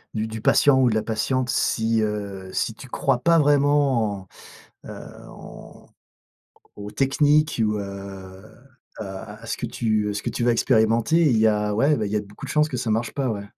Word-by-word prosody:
du 110 0 -1
du 110 0 -7
patient 135 +4 +4
ou 125 - +4
de 110 - -1
la 110 - 0
patiente 125 +3 -1
si, 115 -1 +1
heu, 100 -3 -4
si 115 - -2
tu 130 +4 -13
crois 130 0 0
pas 165 +5 +3
vraiment 140 - +2 0.6
en, - - -12
heu, - - -9 0.2
en - - -13 0.9
aux 105 0 -8
techniques 145 +1 +2
ou, 105 -1 +1
heu, 100 -1 -8 0.6
ou - - -3
à 105 +2 -9
à - - -11
ce 115 - -4
que - - -4
tu 110 -3 -1
à - - -3
ce 100 - -5
que - - -2
tu 120 - -2
vas 120 - +4
expérimenter, 115 +5 +2
il 120 - +2
y 110 - +4
a 105 -1 0
ouais, 140 +6 +2
bah, 110 - -2
il 100 - -4
y - - -1
a 105 - +1
beaucoup 105 0 -11
de - - -6
chances 150 0 +2
que 125 - -4
ça 115 -1 -3
marche 110 +1 -1
pas, 135 -2 -2
ouais. 105 -3 -4
110 Hz, 215 wpm, -23 LUFS, 105-130 Hz, 0.9 s, patient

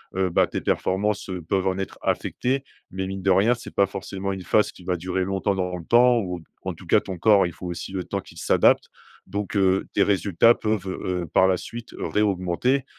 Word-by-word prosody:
heu, 95 -1 +1
bah, 85 - +3
tes - - -4
performances, 105 +2 -1
heu, 90 -1 -4
peuvent 95 +3 -1
en 95 0 0
être 95 - -5
affectées 135 +2 -1 0.3
mais 95 0 -3
mine 95 0 -5
de 95 - +2
rien 100 +6 +4
c'est 120 - -11
pas 100 - +4
forcément 95 0 -5
une 95 -1 -5
phase 105 +3 +2
qui 90 - -16
va 90 -1 0
durer 90 +2 -2
longtemps 95 +1 0
dans 90 -1 -2
le 85 - -9
temps 120 +3 +5
ou, 90 -4 -4 0.2
en - - -3
tout - - -14
cas - - +4
ton 95 - -6
corps 100 +2 +5
il 90 - -3
faut 90 - -10
aussi 85 +1 -5
le 95 -1 -3
temps - - -3
qu'il - - -16
s'adapte, - - +3 0.4
donc, 100 +2 -3
heu, 95 0 +3
tes 100 - +4
résultats 100 +2 +4
peuvent, 105 -4 -2
heu, 90 -1 -3
par 95 - +5
la 95 - +2
suite, 120 +5 -8
réaugmenter, 105 +6 0
95 Hz, 220 wpm, -24 LUFS, 90-105 Hz, 0.4 s, temps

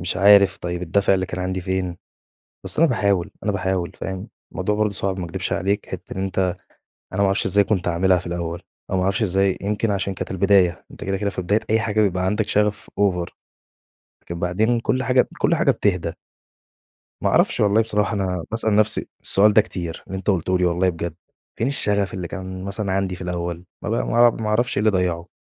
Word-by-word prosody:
مش 90 0 -1
عارف 100 0 +6
طيب 90 0 -4
الدافع 95 +3 +2
اللي 95 -1 -1
كان 90 - -5
عندي 95 0 -2
فين؟! 90 -1 -2 0.7
بس - - +1
أنا 165 - +6
بأحاول، 100 -7 0
أنا 105 - +1
بأحاول، 95 -2 -1
فاهم، 95 -1 -5 0.2
الموضوع 100 +3 -1
برضه 105 0 +1
صعب 95 0 -2
ما 90 - -3
أكدبش 85 - -3
عليك، 100 +3 -1
حِتّة - - -7
إن 95 - -1
أنت 95 -1 -2 0.7
أنا 95 - -2
ما - - +4
أعرفش 100 +2 +1
إزاي 100 0 +4
كنت 95 -5 -1
عاملها 90 +2 +3
في 90 - -9
الأول، 85 -1 -4 0.3
أو 95 - 0
ما 90 - +1
أعرفش 100 +5 0
إزاي 95 -1 +1
يمكن 105 +2 -1
عشان 100 -1 -1
كانت - - -6
البداية، 95 -2 +2
أنت - - -10
كده، 95 0 -1
كده 100 +1 -1
في 95 - -4
بداية 105 +5 +1
أي 110 0 +3
حاجة 110 -1 0
بيبقى 95 -3 +1
عندك 105 +2 0
شغف 105 0 0
Over 90 -4 +1 1.0
لكن 85 0 -7
بعدين 110 +7 +1
كل 130 +2 0
حاجة 125 -1 +4
ب - - -4
كل 170 - +2
حاجة 150 -4 +3
بتهدى. 90 -7 0 1.1
ما - - +2
أعرفش - - +2
والله 105 +2 +4
بصراحة 105 0 0
أنا 90 -4 -2
باسأل 110 -2 +1
نفسي 110 0 +3
السؤال 105 +2 +5
ده 110 - +6
كتير، 85 -5 -6
اللي 95 - -5
أنت 100 - 0
قُلته 95 0 +1
لي 90 - +1
والله 90 +2 +2
بجد، 85 -2 -3 0.4
فين 115 - -1
الشغف 100 -7 +1
اللي 90 -2 -4
كان 95 -1 -6
مثلًا 100 0 -2
عندي 95 -1 -1
في 95 - -9
الأول؟! 85 -1 -4 0.2
ما - - -4
ب 110 - -1
ما 120 0 +4
ما 110 -1 -4
أعرفش 120 +4 +1
إيه - - +2
اللي 110 0 +3
ضيعُه! 90 -3 -1
95 Hz, 215 wpm, -22 LUFS, 90-105 Hz, 1.1 s, عارف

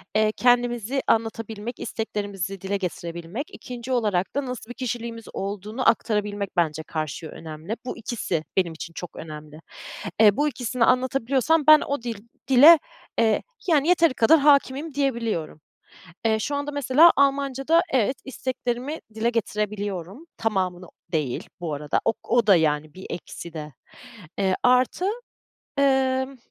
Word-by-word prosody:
eee, 215 0 +3
kendimizi 245 +1 +2
anlatabilmek, 225 0 -1
isteklerimizi 200 -4 -4
dile 195 +1 -1
getirebilmek, 170 - -5
2'nci 245 0 -7
olarak 210 -7 0
da 285 -1 0
nasıl 250 -3 -6
bir - - -5
kişiliğimiz 235 -2 -4
olduğunu 205 +5 -1
aktarabilmek 210 -3 -1
bence 160 -2 +1
karşıya 155 0 -5
önemli. 160 +7 -7
Bu - - -5
ikisi 210 -8 -3
benim 175 -3 +2
için 165 +1 -8
çok 175 - -8
önemli. 155 -1 -9 0.6
Eee, 210 0 +6
bu 295 - +2
ikisini 250 -3 0
anlatabiliyorsam 265 +5 +2
ben 310 0 +9
o 280 -2 -2
dil 235 -3 -4 0.3
dile, 290 +5 +9 0.4
eee, 220 -2 +3 0.2
yani 310 -3 +3
yeteri 335 -5 +4
kadar 255 +7 +5
hâkimim 280 +1 +3
diyebiliyorum. 230 - -2 0.6
Eee, 220 -1 +3
şu 285 +7 -2
anda 285 +1 -3
mesela 285 +4 +6
Almancada 275 +3 +2
evet, 260 +1 +1
isteklerimi 260 +2 -3 0.2
dile 225 +2 +1
getirebiliyorum, 210 - -3
tamamını 185 -5 -1 0.3
değil 150 -6 -2
bu 165 -4 -3
arada, 145 0 -1
o - - +3
o 235 -2 +2
da, 195 -4 +7
yani, 155 -1 0
bir 190 - -9
eksi 170 -1 -7
de. 150 -2 -7 0.7
Eee, 190 -2 +2
artı, 255 +8 +3 0.7
emm, 265 -1 +2
225 Hz, 135 wpm, -24 LUFS, 190-265 Hz, 0.7 s, ben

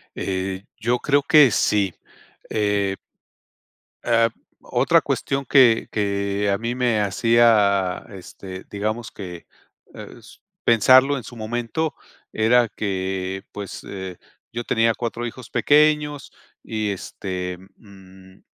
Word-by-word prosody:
Eh, 95 0 -3
yo 120 +2 0
creo 145 +1 +2
que 150 -2 +6
sí, 100 -3 +1 0.6
eh. 100 -2 0 1.1
Ah, 115 -1 +4 0.3
otra - - +2
cuestión 135 0 -2
que 120 -4 +5
que 100 -1 -1
a 100 - +1
mí 115 +3 -3
me 120 -3 +1
hacía, 105 -3 +3
este, 95 -1 -10
digamos 110 +3 -3
que, 90 -4 -9 0.5
eh, - - -10
s - - -17 0.3
pensarlo 130 +5 +5
en 125 - -7
su 120 - -11
momento 120 +8 -3 0.4
era 115 +2 +3
que, 95 -2 -3
pues 100 -1 -7
eh, 95 -2 -7 0.3
yo 120 +1 -5
tenía 115 0 +2
4 120 +1 -4
hijos 120 +1 -8
pequeños 150 -1 +2 0.3
y 110 -2 -2
este, 90 -1 -5 0.2
mm, 95 -2 -17
110 Hz, 115 wpm, -22 LUFS, 95-120 Hz, 1.1 s, que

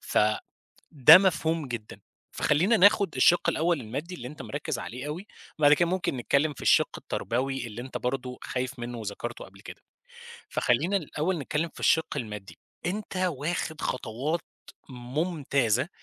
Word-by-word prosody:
فده 105 0 +1 0.8
مفهوم 165 -5 0
جدًا، 115 -3 -7 0.3
فخلّينا 175 +10 +3
ناخد 200 -2 +4
الشِق 175 - +4
الأول 165 -2 +1
المادي 140 +11 -5
اللي 125 -8 -7
أنت 150 - -9
مركز 145 +1 -4
عليه 125 +4 -6
أوي، 170 +7 -5 0.3
بعد 145 -1 +6
كده 170 +3 +4
ممكن 185 -6 -1
نتكلم 140 +5 +1
في - - -11
الشِق - - +4
التربوي 130 +1 -2
اللي 115 +1 -7
أنت 130 - -6
برضو 125 0 -3
خايف 130 +1 -4
منه 120 0 -5
وذكرته 110 +3 -6
قبل 95 +1 -16
كده. - - -11 0.7
فخلّينا 155 +11 +1
الأول 165 +1 -2
نتكلم 150 +3 -2
في - - -11
الشِق 160 -2 +2
المادي، 105 -6 -6 0.3
أنت 200 +1 -4
واخد 165 -2 -2
خطوات 130 +7 -2 0.5
ممتازة 135 -1 -1
145 Hz, 140 wpm, -27 LUFS, 125-170 Hz, 0.8 s, بعد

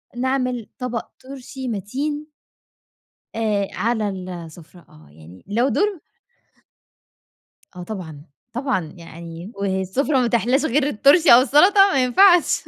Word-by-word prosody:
نعمل 255 -2 -2
طبق 250 -3 -4 0.2
طُرشي 265 0 -9
مَتين 270 +8 -4 1.1
آآ 210 -3 -1
على 220 -2 -1
ال 185 -2 -7
السفرة 170 0 -11
آه، 75 0 -19
يعني 80 +5 -16
لو 235 +6 0
دُور 405 +3 0 1.8
آه 180 - -8
طبعًا، 165 -7 -8 0.3
طبعًا، 245 - -3
يعني 170 +2 -10
والسفرة 200 +9 -1
ما 245 - +1
تحلاش 245 +5 +1
غير 285 0 +1
الطُرشي 285 - +5
أو 240 - +8
السلطة 365 - +5
ما 265 -2 +2
ينفعش. 350 +7 +4
235 Hz, 120 wpm, -21 LUFS, 185-270 Hz, 1.8 s, أو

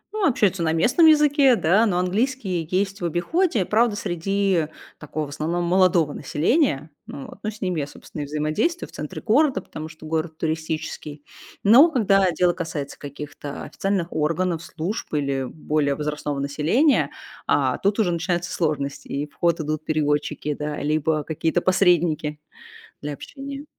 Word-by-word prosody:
Ну, 425 -3 +2
общаются 205 - +2
на 160 -1 +1
местном 245 - +4
языке, 290 -4 +5
да, 205 +4 +3
но 180 -4 0
английский 190 - -1
есть 195 +2 -1
в - - -1
обиходе. 210 - +1
Правда, 220 +2 +2
среди 195 -2 0 0.3
такого 150 0 -4
в - - -10
основном 160 +4 -2
молодого 175 -3 +3
населения. 155 - 0 0.2
Ну 140 - -7
вот. - - -13
Ну, 215 - -2
с 215 0 -10
ними 180 -4 -1
я, 140 - -2
собственно, 150 - -9
и - - -3
взаимодействую 155 - -1
в - - -19
центре - - -7
города, 270 +5 +3
потому 155 +1 -8
что 155 0 -13
город 160 0 -2
туристический. 155 -2 -4 0.4
Но 245 +11 +8
когда 195 - +3
дело 175 +1 +2
касается 160 -5 -5
каких-то 145 0 -7
официальных 195 -3 -2
органов, 165 +2 0
служб 180 +8 -5
или 140 -2 -1
более 150 0 -1
возрастного 150 -1 -3
населения, 155 - +2 0.4
а, - - +2
тут 200 +1 +1
уже 210 -6 +2
начинаются 175 +2 -1
сложности. 145 -4 -2
И 140 +1 -2
в 145 - -28
ход 170 +2 +1
идут 155 0 -3
переводчики, 150 -1 -1
да, 150 +1 -4
либо 155 +1 +1
какие-то 160 +3 -1
посредники 170 -5 +2 0.6
для 150 0 -3
общения. 275 - -8
170 Hz, 155 wpm, -23 LUFS, 150-200 Hz, 0.6 s, Но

